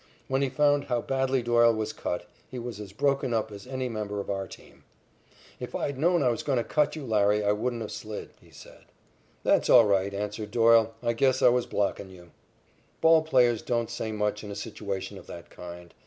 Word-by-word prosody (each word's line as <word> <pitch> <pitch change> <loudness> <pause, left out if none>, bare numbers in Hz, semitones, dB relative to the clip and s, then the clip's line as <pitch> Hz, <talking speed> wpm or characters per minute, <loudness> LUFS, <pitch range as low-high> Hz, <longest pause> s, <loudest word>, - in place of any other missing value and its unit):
When 135 +1 0
he 140 - +1
found 145 0 +2
how 120 -2 0
badly 135 -1 0
Doyle 120 -1 +4
was 110 -1 -3
cut, - - -4 0.2
he 130 - -7
was 120 -3 -6
as 105 -2 -8
broken 135 +1 0
up 110 -1 -1
as 100 +2 -10
any 130 -1 -3
member 105 -3 -4
of 100 - -4
our 95 -1 -3
team. - - -15 0.8
"If - - -7
I'd 140 -2 -3
known 175 +1 +3
I 125 - +3
was 115 - -1
goin' 140 -3 0
to 120 - +1
cut 150 +3 +1
you, 155 -3 -6
Larry, 105 -2 +2
I 100 - +3
wouldn't 115 +2 -2
have 105 - -7
slid," 105 -1 -7
he - - -20
said. - - -15 0.6
"That's - - +2
all 120 -3 +8
right," 100 -1 +1
answered 105 +1 -4
Doyle. 115 -1 +4
"I 120 0 +1
guess 130 +2 +2
I - - +8
was 125 0 +1
blockin' 100 -1 -2
you." 90 -2 -15 0.7
Ball 160 0 +6
players 125 -7 +3
don't 115 -1 -1
say 115 -1 -4
much 105 0 -2
in 105 - -8
a 100 - -6
situation 100 -1 -5
of - - -16
that 85 - -10
kind. 85 0 -10
115 Hz, 215 wpm, -27 LUFS, 105-130 Hz, 0.8 s, all